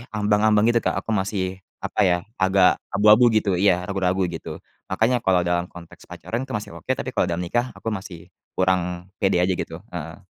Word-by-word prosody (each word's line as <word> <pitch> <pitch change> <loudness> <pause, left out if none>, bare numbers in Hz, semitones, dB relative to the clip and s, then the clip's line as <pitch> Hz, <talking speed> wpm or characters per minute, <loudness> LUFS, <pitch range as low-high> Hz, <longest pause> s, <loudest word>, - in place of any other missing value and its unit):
ambang-ambang, 105 0 +3
gitu, 115 - +3
Kak. - - -1
Aku 115 - -3
masih, 95 -2 -2 0.2
apa - - -4
ya, 90 -1 +3 0.2
agak 95 -1 +4
abu-abu, 105 +4 +6
gitu. 105 -3 +2
Iya, 90 -2 +3
ragu-ragu, 95 -1 0
gitu. 80 - -7 0.3
Makanya 115 +6 +2
kalau 90 -4 +2
dalam 85 0 0
konteks 85 -1 -14
pacaran, 115 +2 -5
itu 130 - -7
masih 105 - -5
oke, - - -17
tapi - - -5
kalau - - +1
dalam 85 +1 -2
nikah, 120 +8 -1
aku 115 - -4
masih 95 -4 -8 0.3
kurang 90 0 0
pede 95 -3 +3
aja, 95 +1 +2
gitu, - - -5 0.2
heeh. - - -6
95 Hz, 185 wpm, -23 LUFS, 90-105 Hz, 0.3 s, abu-abu